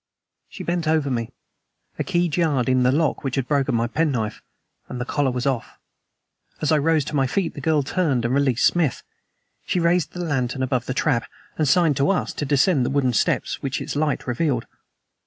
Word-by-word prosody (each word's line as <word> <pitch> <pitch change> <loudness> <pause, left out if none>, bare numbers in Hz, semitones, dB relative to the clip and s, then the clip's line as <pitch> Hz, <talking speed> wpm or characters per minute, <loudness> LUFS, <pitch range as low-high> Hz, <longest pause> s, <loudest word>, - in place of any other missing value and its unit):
She - - -8
bent 170 -2 -1
over 155 -3 +1
me; 115 -2 -2 0.7
a - - +1
key 175 0 +1
jarred 150 -6 +1
in 130 0 +3
the 125 0 +4
lock 150 +1 0
which 135 -2 -2
had 135 -3 -1
broken 140 -3 +1
my 115 0 +1
penknife 120 -5 -1 0.5
and 125 - -5
the 125 - -2
collar 145 0 0
was 125 +1 -3
off. 130 -4 -2 0.8
As 150 - 0
I 155 - +4
rose 155 -1 +2
to 150 - -5
my 135 -2 +2
feet 175 +5 -1
the 145 - -8
girl 150 0 +2
turned 140 -6 0
and 120 - 0
released 135 -3 +2
Smith. 165 -7 +1 0.6
She 180 - -1
raised 170 -1 +1
the 180 - -4
lantern 130 -3 -1
above 130 -1 -1
the 130 - -2
trap, 130 -6 0 0.3
and 155 - 0
signed 155 0 +3
to 140 +5 +2
us 195 - 0
to 145 - -3
descend 145 +1 +3
the - - 0
wooden 135 -3 +1
steps - - 0
which 135 -1 -2
its - - -5
light 150 -1 0
revealed. 125 -2 -1
140 Hz, 205 wpm, -23 LUFS, 125-160 Hz, 0.8 s, the